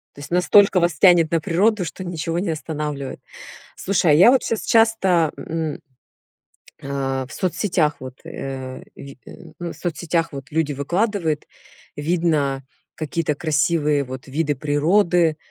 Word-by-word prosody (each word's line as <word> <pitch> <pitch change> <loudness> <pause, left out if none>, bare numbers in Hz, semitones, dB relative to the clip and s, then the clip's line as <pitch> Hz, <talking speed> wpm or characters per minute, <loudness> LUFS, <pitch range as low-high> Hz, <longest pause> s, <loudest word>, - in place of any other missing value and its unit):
То - - -13
есть 145 +3 -9
настолько 185 +2 +5
вас 170 -1 +1
тянет 175 -4 +5
на 165 -1 +1
природу, 195 +5 +1
что 185 +2 -7
ничего 170 0 -3
не 185 -2 -2
останавливает. 150 -3 -4 0.6
Слушай, 185 -4 +1
а - - +6
я 180 +10 +7
вот 265 - +3
щас 225 - -2
часто, 195 -8 +3
мм, 160 +1 -4 1.0
а-а, 135 -1 -3
в - - -12
соцсетях 180 -4 0
вот, 130 -1 -8
э-э, 130 -1 -7
ви 140 -1 -11 0.4
ну, 170 -1 -4
в - - -14
соцсетях 165 -1 -2
вот 135 -2 -8
люди 155 -1 0
выкладывают, 170 - -1 0.5
видно 145 -4 0 0.3
какие-то 155 -1 -2
красивые 150 -1 +1
вот 130 +1 -8
виды 145 +1 -1
природы. 160 +3 +2
160 Hz, 140 wpm, -21 LUFS, 145-175 Hz, 1.0 s, я